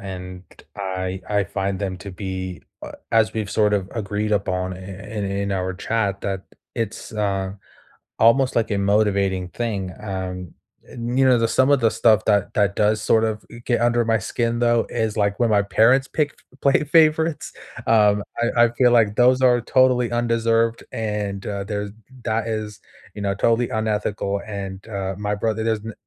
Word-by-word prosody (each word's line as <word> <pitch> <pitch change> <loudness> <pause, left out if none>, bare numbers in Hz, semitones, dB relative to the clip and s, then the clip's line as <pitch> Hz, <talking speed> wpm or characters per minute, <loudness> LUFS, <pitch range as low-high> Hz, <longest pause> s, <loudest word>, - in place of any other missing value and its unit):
and 90 -1 -8 0.3
I 95 -1 -3
I 105 -1 +2
find 100 0 -3
them 95 -2 -3
to 100 -1 -8
be 95 -1 -5 0.2
uh, - - -7 0.2
as 110 -1 +3
we've 110 -2 -3
sort 105 -1 +2
of 95 -2 -2
agreed 105 -1 -2
upon 95 -2 -1
i - - -9
in 95 +3 -6
in 100 0 -2
our 95 -1 -2
chat, 100 0 -1
that 95 -1 -3 0.3
it's, 115 -2 -4
uh, 100 -3 -1 0.7
almost 130 +3 +4
like 115 - +1
a 105 - +1
motivating 100 -2 +1
thing, 100 -3 -3
um, 95 -3 -5 0.3
and, 120 +2 -4
you 135 - +5
know, 130 -2 +5
the 115 0 +1
some 130 +4 +3
of 140 -2 +4
the 115 -2 +3
stuff 110 -2 +3
that 100 -2 +2
that 100 -1 +1
does, 105 0 +2
sort 110 +1 +3
of, 110 -1 -2
i - - -12
get 120 -2 +1
under 120 0 +2
my 115 0 +2
skin 115 +4 -2
though, 120 -1 +2
is, 110 -2 -1
like, 100 -2 0
when 120 - +3
my 105 -1 +4
parents 125 +7 +3
pick 150 -2 0 0.2
f 135 - -23
play 140 +2 +3
favorites, 160 0 +2 0.3
um, 105 -2 +4 0.2
I 120 0 +3
I - - +3
feel 125 0 +3
like 110 -3 +3
those 125 +1 +4
are 125 -2 +4
totally 125 -1 +3
undeserved, 115 -1 +1
and, 105 -3 -3
uh, 100 -1 -3
there 105 0 -3 0.4
that 110 0 0
is, 105 -2 -4 0.3
you 105 - -6
know, 100 -1 0
totally 115 +3 +1
unethical. 105 -2 -1
And, 100 -2 -6
uh, 95 -2 -3
my 105 0 -1
brother, 110 +1 -1
there's 110 -2 0
n 115 - -5
105 Hz, 185 wpm, -22 LUFS, 100-115 Hz, 0.7 s, you